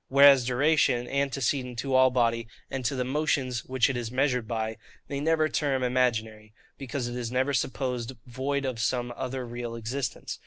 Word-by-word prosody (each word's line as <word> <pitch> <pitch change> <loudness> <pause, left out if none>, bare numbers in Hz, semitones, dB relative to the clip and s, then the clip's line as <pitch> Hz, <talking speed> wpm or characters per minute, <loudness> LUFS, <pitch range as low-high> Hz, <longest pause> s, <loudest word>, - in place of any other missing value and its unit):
Whereas 140 -2 +7
duration, 130 -2 +2
antecedent 135 -2 -1
to 135 +2 -2
all 130 0 +6
body, 115 -2 +1 0.2
and 135 -1 -3
to 130 - 0
the 130 - 0
motions 130 -3 0
which 130 -2 +2
it 135 - -2
is 120 -2 -3
measured 125 -2 0
by, 110 -1 -2 0.3
they 140 - -3
never 155 +1 +2
term 140 -4 0
imaginary: 110 -4 0 0.3
because 135 -2 -3
it 120 - -5
is 120 -2 -4
never 130 +3 +1
supposed 130 -2 -2
void 135 +3 -2
of 130 -3 -3
some 120 +2 -1
other 130 -1 -4
real 120 -1 -5
existence. 125 +4 -4
125 Hz, 170 wpm, -27 LUFS, 120-135 Hz, 0.3 s, Whereas